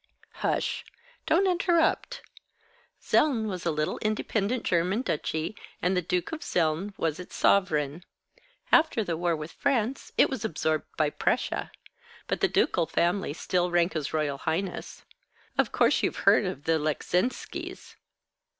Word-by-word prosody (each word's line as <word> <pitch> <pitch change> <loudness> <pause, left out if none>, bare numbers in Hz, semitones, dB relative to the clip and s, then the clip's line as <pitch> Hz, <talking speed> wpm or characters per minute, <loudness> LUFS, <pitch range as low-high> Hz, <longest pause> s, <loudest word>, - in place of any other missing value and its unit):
"Hush. - - -1 0.4
Don't 360 +5 +4
interrupt. 355 +6 +1 0.8
Zeln 255 -8 +3
was 185 -4 -3
a - - +3
little 155 0 -1
independent 215 +2 -1
German 180 +7 +1
duchy, 160 - -2 0.2
and 180 +1 +1
the 180 - +2
Duke 180 +1 -1
of 320 - -4
Zeln 180 - -1
was 160 0 -1
its 180 - -9
sovereign. 160 -5 +2 0.7
After 310 -8 +4
the 170 -4 -2
war 170 0 0
with 155 +1 -7
France 260 -2 -1
it - - +6
was 265 -5 -4
absorbed 155 -1 -1
by 155 -2 +2
Prussia. - - -1 0.6
But - - -2
the - - +5
ducal 165 - +1
family 175 0 0
still 180 +2 0
rank 175 +1 +2
as 150 -3 -2
royal 150 -3 -1
highness. 175 +4 -3 0.5
Of - - +2
course, - - +3
you've - - -1
heard - - +6
of 140 - -4
the 160 0 +2
Leczinskis?" 175 - -2
180 Hz, 140 wpm, -27 LUFS, 160-215 Hz, 0.8 s, it